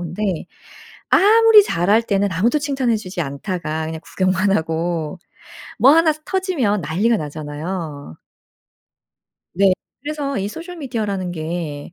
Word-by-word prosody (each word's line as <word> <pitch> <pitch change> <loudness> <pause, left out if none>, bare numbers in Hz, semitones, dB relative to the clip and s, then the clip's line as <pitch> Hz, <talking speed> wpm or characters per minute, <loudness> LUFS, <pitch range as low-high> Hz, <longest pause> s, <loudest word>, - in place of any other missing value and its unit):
근데 175 +4 -5 0.9
아무리 440 +1 +7
잘할 205 - +2
때는 200 -3 0
아무도 230 - +2
칭찬해 270 -5 0
주지 185 -4 -6
않다가 155 +2 -4
그냥 160 0 -5
구경만 190 +1 +1
하고 165 0 -2 0.6
뭐 270 - +7
1 320 0 +5
스 310 - -17
터지면 320 - 0
난리가 205 +10 +1
나잖아요. 150 - -6 1.4
네. 195 0 +4 0.3
그래서 290 -3 -3
이 200 +1 -2
소셜 345 - -8
미디어라는 210 - -3
게 160 -2 -5
195 Hz, 260 characters per minute, -20 LUFS, 165-265 Hz, 1.4 s, 아무리